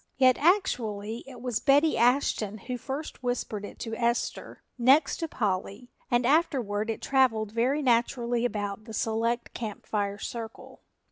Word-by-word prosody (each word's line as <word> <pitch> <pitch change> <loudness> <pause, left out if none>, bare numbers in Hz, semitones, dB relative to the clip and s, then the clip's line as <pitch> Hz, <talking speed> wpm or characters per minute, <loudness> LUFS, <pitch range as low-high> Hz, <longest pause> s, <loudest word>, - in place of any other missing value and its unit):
Yet 255 -2 +6
actually 230 - +1
it 255 -2 -11
was 245 -3 -1
Betty 290 +4 +4
Ashton 235 -4 +2
who 250 +5 -5
first 280 +4 -6
whispered 245 -4 -2
it 205 - -8
to 225 - -4
Esther, 235 0 -2
next 260 +5 +4
to 330 - -3
Polly, 210 -1 -3 0.2
and 240 0 +2
afterward 245 -8 +1
it 225 - -3
traveled 225 -6 +2
very 255 +6 +1
naturally 240 -1 +1
about 210 -3 -3
the 225 - -9
select 230 +2 -1
Camp 215 -3 -6
Fire 205 -1 -1
circle. 225 +1 -7
235 Hz, 145 wpm, -28 LUFS, 215-260 Hz, 0.2 s, Yet